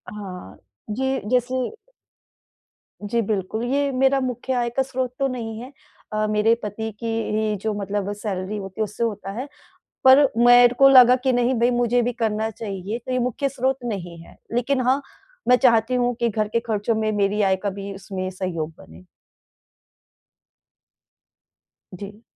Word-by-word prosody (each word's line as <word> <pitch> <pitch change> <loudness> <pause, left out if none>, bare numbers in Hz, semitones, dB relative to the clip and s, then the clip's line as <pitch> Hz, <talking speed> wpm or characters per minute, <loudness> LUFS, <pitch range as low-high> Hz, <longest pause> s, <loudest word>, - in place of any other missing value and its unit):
हाँ। 180 - -9 0.4
ये 265 0 0
जैसे 250 +1 +1 1.5
जी 230 +3 0
बिल्कुल। 215 +1 -2
ये 280 0 +1
मेरा 265 +1 +2
मुख्य 255 0 -3
आय 240 -1 0
का 265 - +4
स्रोत 255 -1 -3
तो 275 - +2
नहीं 225 -3 -5
है। 255 +3 -9 0.4
अ, 215 0 +1
मेरे 215 +2 +3
पति 220 +2 -4
की 230 - -4 0.3
ही 215 -1 0
जो 220 -1 -1
मतलब 200 0 -2
सैलरी 205 -1 -4
होती 195 +2 -6
है - - +4
उससे 210 +3 -4
होता 205 -3 -3
है। 270 - -4 0.6
पर 265 +2 +8 0.2
मेरे 245 0 +7
को 275 - +8
लगा 250 -2 +8
कि 260 - +3
नहीं 245 +1 +2
भई 240 +1 +3
मुझे 240 0 +2
भी 245 +1 -1
करना 220 -1 -1
चाहिए, 205 -1 -5
तो 255 +2 -6
ये 255 - +1
मुख्य 250 +3 -1
स्रोत 265 0 -1
नहीं 175 -7 -5
है। - - -17 0.2
लेकिन 255 +3 0
हाँ 265 +2 +3 0.5
मैं 250 - +7
चाहती 235 -1 +3
हूँ 245 -1 +1
कि 235 - +2
घर 215 -1 -1
के 230 +2 0
खर्चों 225 -1 -1
में 220 0 0
मेरी 205 0 +1
आय 190 -1 +3
का 200 - -1
भी 200 +1 -7
उसमें 190 -1 -5
सहयोग 175 -4 -4
बने। 80 +3 -15 2.9
जी। 205 +3 -10
225 Hz, 165 wpm, -23 LUFS, 205-250 Hz, 2.9 s, पर